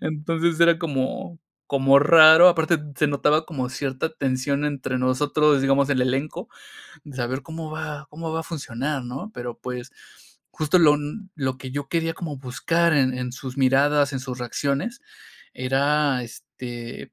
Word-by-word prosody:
Entonces, 160 +2 -1
era 170 0 +5
como 160 +1 -3 0.3
como 135 0 +5
raro, 160 +3 +8
aparte, 165 -1 +2 0.2
se 150 - +2
notaba 150 +2 +1
como 130 -6 -4
cierta 135 +3 -3
tensión 140 +1 -1
entre 135 -3 -2
nosotros, 145 +3 +2
digamos, 135 +1 +2
el 135 -2 +1
elenco, 135 +4 -2 0.6
de 145 -3 -12
saber 130 +2 -3
cómo 160 +2 -7
va 155 -1 -6
cómo 160 +1 -6
va 165 - -1
a - - -6
funcionar, 140 -3 -4
¿no? 130 - -7
Pero, 120 -1 -6
pues, 125 -1 -7 0.6
justo 155 +4 +1
lo 150 -3 +5 0.4
lo 130 -3 -2
que 130 0 -8
yo 140 +1 -5
quería 165 0 -1
como 160 -4 -6
buscar 140 +7 0
en-en 130 -3 0
sus 130 +1 -8
miradas, 140 +2 +3
en 135 - -3
sus 130 -1 -7
reacciones, 140 - -3 0.5
era, 135 +1 +1
este, 120 0 -9
140 Hz, 150 wpm, -23 LUFS, 130-155 Hz, 0.6 s, raro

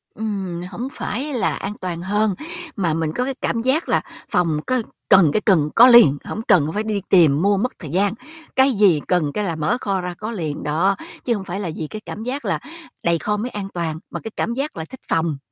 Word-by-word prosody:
Ừm, 195 -5 -3
hổng 240 +8 -4
phải 290 -1 -4
là 245 - +1
an 200 +1 -4
toàn 175 -2 -4
hơn, 205 +2 +1 0.4
mà 180 -6 0
mình 160 -1 -1
có 250 - +1
cái 270 - -2
cảm 230 - 0
giác 265 +7 +1
là - - +3 0.3
phòng 165 -4 +2
có 255 -1 +1 0.3
cần, 190 -5 +7
cái 215 - +2
cần 165 -9 +3
có 245 +2 +9
liền, 235 - +8
hổng 220 - -4
cần 155 -3 +4
phải 210 - -1
đi 215 -2 -2
tìm 160 -6 +5
mua 200 +2 +3
mất 250 +6 0
thời 155 - -8
gian, 195 +6 +1 0.4
cái 265 +1 +5
gì 195 -8 +4
cần 170 -5 +1
cái 210 - -1
là 170 -5 -1
mở 160 +10 0
kho 195 -2 -1
ra 180 0 -4
có 215 +2 -5
liền. 160 -9 -4
Đó, 170 +7 +2 0.3
chứ 240 - +2
hông 200 - -3
phải 190 +1 -4
là 185 -5 -3
vì 155 - -4
cái 215 +6 -7
cảm 215 - -6
giác 265 +4 -4
là - - 0 0.4
đầy 170 0 +2
kho 210 0 -1
mới 230 +4 -3
an 205 -4 -5
toàn, 165 -3 -3
mà - - -5
cái 225 - -7
cảm 235 - -1
giác 275 - -3
là 160 - -4
thích 260 - -12
phòng. 165 -3 0
195 Hz, 240 wpm, -21 LUFS, 165-225 Hz, 0.4 s, có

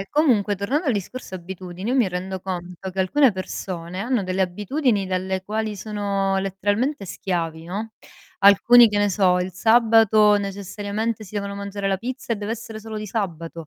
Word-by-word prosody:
Ehm, 195 - -4
comunque 225 -10 +2
tornando 270 - -1
al 260 - +3
discorso 205 +1 -5
abitudini, 185 +3 -6
io - - +1
mi 235 -7 +3
rendo 185 +1 -4
conto 180 0 -6
che 190 - -10
alcune 260 +9 +4
persone 185 -2 -5
hanno 235 -2 0
delle 185 +1 -2
abitudini 205 - 0
dalle 185 0 -2
quali 215 +1 -2
sono 200 -2 -1
letteralmente 205 +6 -1
schiavi, 165 -4 -3
no; 215 +5 -5 0.5
alcuni, 220 +4 +7
che 210 - -2
ne 205 - +3
so, 185 -2 +3
il 180 0 -3
sabato 220 0 +5
necessariamente 205 +3 -3
si 205 - -14
devono 200 0 -3
mangiare 200 0 -4
la 190 -1 0
pizza 250 +1 -4
e - - -1
deve 205 +1 -5
essere 225 -1 -7
solo 220 0 -7
di 215 0 -5
sabato; 170 -6 -4
200 Hz, 175 wpm, -23 LUFS, 185-220 Hz, 0.5 s, alcuni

